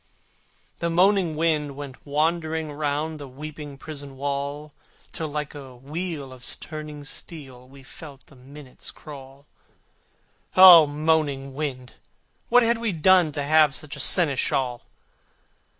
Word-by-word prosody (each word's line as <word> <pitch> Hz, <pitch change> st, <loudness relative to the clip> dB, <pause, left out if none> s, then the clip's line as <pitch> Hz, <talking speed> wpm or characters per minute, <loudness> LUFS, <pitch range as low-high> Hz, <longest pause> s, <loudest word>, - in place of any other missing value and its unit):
The 170 Hz, -, -1 dB
moaning 180 Hz, -1 st, +3 dB
wind 150 Hz, -3 st, 0 dB
went 140 Hz, -1 st, -10 dB
wandering 160 Hz, +1 st, -1 dB
round 150 Hz, +1 st, -2 dB
The 145 Hz, -, -8 dB
weeping 145 Hz, +1 st, -9 dB
prison 140 Hz, -2 st, -8 dB
wall: 140 Hz, +2 st, -4 dB, 0.4 s
Till 160 Hz, -, -3 dB
like 150 Hz, 0 st, -5 dB
a 135 Hz, -4 st, -10 dB
wheel 145 Hz, +1 st, -5 dB
of 125 Hz, -1 st, -15 dB, 0.2 s
turning 150 Hz, -2 st, -8 dB
steel 135 Hz, -4 st, -7 dB
We 135 Hz, 0 st, -15 dB
felt 140 Hz, -1 st, -12 dB
the -, -, -20 dB
minutes 135 Hz, +1 st, -12 dB
crawl: 140 Hz, -1 st, -12 dB, 1.1 s
O 175 Hz, -4 st, +10 dB
moaning 145 Hz, -2 st, 0 dB
wind! 130 Hz, -4 st, -5 dB, 0.6 s
what 245 Hz, +1 st, +6 dB
had 230 Hz, 0 st, +2 dB
we 230 Hz, -2 st, -1 dB
done 175 Hz, 0 st, +4 dB
To 145 Hz, -, -2 dB
have 155 Hz, -1 st, +4 dB
such 150 Hz, -2 st, -3 dB
a -, -, -9 dB
seneschal? 135 Hz, -5 st, +1 dB
150 Hz, 130 wpm, -24 LUFS, 140-160 Hz, 1.1 s, O